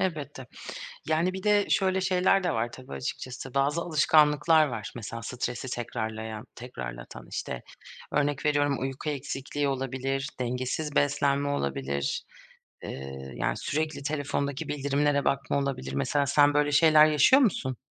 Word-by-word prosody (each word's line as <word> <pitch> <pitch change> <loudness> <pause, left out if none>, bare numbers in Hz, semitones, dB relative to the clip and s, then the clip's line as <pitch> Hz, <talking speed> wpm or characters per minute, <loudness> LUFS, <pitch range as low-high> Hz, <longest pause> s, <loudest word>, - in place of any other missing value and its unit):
Elbette. 145 -7 -3 0.6
Yani, 170 +4 +2
bir 190 - -6
de 205 -1 +3
şöyle 190 -1 +2
şeyler 185 +1 +3
de 175 - +1
var 120 -1 -1
tabii 125 - -10
açıkçası. 125 - -5
Bazı 140 +4 +1
alışkanlıklar 155 -1 +4
var 110 -5 -5
mesela 115 0 -6
stresi 125 +1 -4
tekrarlayan 110 -2 -4
tekrarlatan; 60 - -8
işte, 60 - -4 0.5
örnek 145 0 0
veriyorum 145 -2 +2
uyku 135 +3 -3
eksikliği 140 0 -3
olabilir, 135 +1 -2
dengesiz 130 +5 -2
beslenme 140 0 +2
olabilir, 70 - -2 0.6
eee, 65 0 -7
yani, - - -1
sürekli 155 -1 -2
telefondaki 145 -1 -2
bildirimlere 140 0 +1
bakma 140 +1 +1
olabilir. 135 - -2
Mesela 140 - +1
sen 145 +1 +4
böyle 145 0 +2
şeyler 155 +1 +7
yaşıyor 155 - +5
musun? 130 - +1
140 Hz, 130 wpm, -28 LUFS, 125-150 Hz, 0.6 s, şeyler